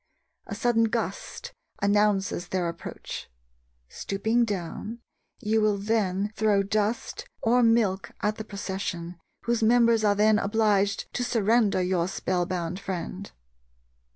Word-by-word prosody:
A - - -5
sudden 235 -3 +2
gust 220 - -4 0.3
announces 200 -3 +1
their 180 -2 -1
approach. 170 0 -7 0.6
Stooping 220 - 0
down, 205 +2 -4 0.4
you 220 -2 +1
will 210 -1 +2
then 205 -1 0
throw 210 -3 +3
dust 215 +3 -2 0.2
or 245 +2 +4
milk 220 -6 +2
at 210 +1 -1
the 220 - -4
procession, 190 -4 -5 0.2
whose 235 0 0
members 230 0 +4
are 205 -1 +4
then 210 +1 +4
obliged 205 -1 +1
to 245 - -1
surrender 220 -4 +2
your 180 -2 +1
spell 185 -2 -1
bound 180 -1 -3
friend. 190 0 -5
205 Hz, 125 wpm, -27 LUFS, 190-225 Hz, 0.6 s, or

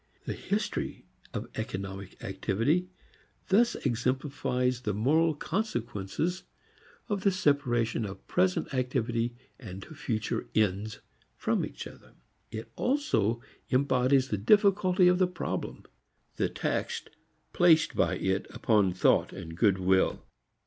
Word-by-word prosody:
The - - -2
history - - -3 0.3
of - - -4
economic 95 0 -6
activity 115 - 0 0.6
thus 230 +5 +4
exemplifies 125 0 -1
the 105 -5 -2
moral 155 +8 +3
consequences 150 - -2 0.7
of 205 -3 -1
the 200 - +4
separation 130 - +1
of 95 -1 -8
present 90 +6 +1
activity 120 -2 0 0.2
and 95 -6 -8
future 115 -8 -3
"ends" 105 0 0 0.3
from - - 0
each - - -6
other. - - -13 0.3
It 110 +1 -7
also 245 - +1 0.3
embodies 130 0 +3
the 105 - -1
difficulty 190 - +4
of 180 0 +4
the 185 - +4
problem 180 - -4 0.5
the - - +1
tax - - -2 0.5
placed 170 -3 +5
by - - +2
it 95 +1 -1
upon 105 -9 +2
thought 90 - +3
and 85 -4 -8
good 95 +1 +3
will. 95 0 +2
125 Hz, 115 wpm, -29 LUFS, 100-165 Hz, 0.7 s, placed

